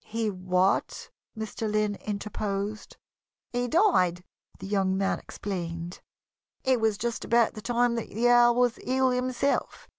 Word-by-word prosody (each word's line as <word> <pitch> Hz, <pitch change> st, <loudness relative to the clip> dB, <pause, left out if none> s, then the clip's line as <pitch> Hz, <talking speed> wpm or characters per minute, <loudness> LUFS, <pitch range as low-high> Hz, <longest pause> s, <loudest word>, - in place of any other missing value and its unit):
"He 225 Hz, -1 st, -2 dB
what?" 185 Hz, 0 st, 0 dB, 0.3 s
Mr. 220 Hz, 0 st, -4 dB
Lynn 215 Hz, -1 st, +1 dB
interposed. 205 Hz, 0 st, -4 dB, 0.6 s
"He 245 Hz, 0 st, 0 dB
died," 205 Hz, -, +3 dB, 0.3 s
the -, -, -9 dB
young 195 Hz, -1 st, +1 dB
man 195 Hz, 0 st, 0 dB
explained. 170 Hz, -3 st, -6 dB, 0.6 s
"It 260 Hz, -3 st, +2 dB
was 220 Hz, -2 st, +2 dB
just 235 Hz, +1 st, -3 dB
about 235 Hz, -1 st, +3 dB
the 215 Hz, -, -8 dB
time 240 Hz, +3 st, +1 dB
that 230 Hz, -, -4 dB
the 230 Hz, +4 st, +1 dB
Earl 240 Hz, 0 st, +6 dB
was 245 Hz, -1 st, +2 dB
ill 260 Hz, 0 st, +1 dB
himself. 255 Hz, +2 st, -1 dB
215 Hz, 140 wpm, -27 LUFS, 195-245 Hz, 0.6 s, Earl